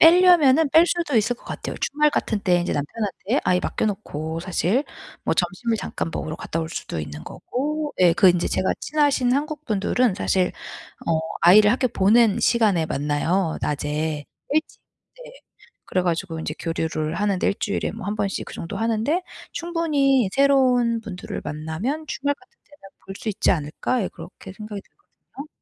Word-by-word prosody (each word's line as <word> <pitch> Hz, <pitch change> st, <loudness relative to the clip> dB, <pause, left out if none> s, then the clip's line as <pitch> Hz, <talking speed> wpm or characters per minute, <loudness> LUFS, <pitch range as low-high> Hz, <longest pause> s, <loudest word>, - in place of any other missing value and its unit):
빼려면은 325 Hz, -4 st, +6 dB
뺄 325 Hz, +3 st, +6 dB
수도 340 Hz, -7 st, 0 dB
있을 230 Hz, +3 st, +2 dB
것 -, -, -22 dB
같아요. -, -, -6 dB
주말 300 Hz, +1 st, +2 dB
같은 220 Hz, -6 st, -1 dB
때 180 Hz, -3 st, +3 dB
인제 175 Hz, -, -2 dB
남편한테 205 Hz, -, -2 dB
아이 180 Hz, 0 st, +2 dB
맡겨놓고 165 Hz, -8 st, -3 dB
사실 185 Hz, -, 0 dB, 0.4 s
뭐 -, -, 0 dB
점심을 185 Hz, +6 st, -1 dB
잠깐 165 Hz, -, -4 dB
먹으러 155 Hz, -, -4 dB
갔다 165 Hz, -, -4 dB
올 160 Hz, -, -4 dB
수도 80 Hz, -, -5 dB
있는 75 Hz, 0 st, -6 dB
거고. 300 Hz, +3 st, -3 dB
예. 175 Hz, -2 st, +6 dB
그 185 Hz, -, +6 dB
인제 175 Hz, -1 st, 0 dB
제가 185 Hz, -, +1 dB
친하신 285 Hz, -5 st, +2 dB
한국 300 Hz, +2 st, -3 dB
분들은 215 Hz, +2 st, +1 dB
사실 185 Hz, -1 st, +1 dB, 0.5 s
어 165 Hz, -1 st, +2 dB, 0.2 s
아이를 205 Hz, +4 st, +7 dB
학교 255 Hz, +1 st, +1 dB
보낸 215 Hz, +1 st, +3 dB
시간에 205 Hz, -9 st, +3 dB
만나요. 155 Hz, +5 st, 0 dB
낮에 150 Hz, +1 st, -2 dB, 0.3 s
일찍 310 Hz, +2 st, -1 dB, 0.4 s
네. -, -, -11 dB, 0.5 s
그래가지고 175 Hz, -2 st, -1 dB
인제 160 Hz, -, -4 dB
교류를 160 Hz, -1 st, -2 dB
하는데 200 Hz, -1 st, 0 dB
1 -, -, +2 dB
주일에 205 Hz, -, -1 dB
뭐 215 Hz, -3 st, -8 dB
1 205 Hz, -, -1 dB
번씩 200 Hz, -2 st, -2 dB
그 -, -, -9 dB
정도 165 Hz, -, -6 dB
하는데 230 Hz, +10 st, 0 dB, 0.3 s
충분히 290 Hz, -, +1 dB
새로운 255 Hz, -4 st, +3 dB
분들을 190 Hz, -5 st, -6 dB
만나면 160 Hz, -, -4 dB
'주말 285 Hz, +1 st, -1 dB
같은 -, -, -25 dB
때는 290 Hz, -10 st, -17 dB, 0.2 s
볼 195 Hz, -, -7 dB
수 -, -, -5 dB
있지 205 Hz, -, +1 dB
않을까?' 165 Hz, +9 st, -1 dB
예 -, -, -2 dB
그렇게 175 Hz, +3 st, -11 dB
생각이 210 Hz, -1 st, -7 dB
들거든요. 300 Hz, -7 st, -14 dB
210 Hz, 340 characters per minute, -23 LUFS, 170-275 Hz, 0.5 s, 아이를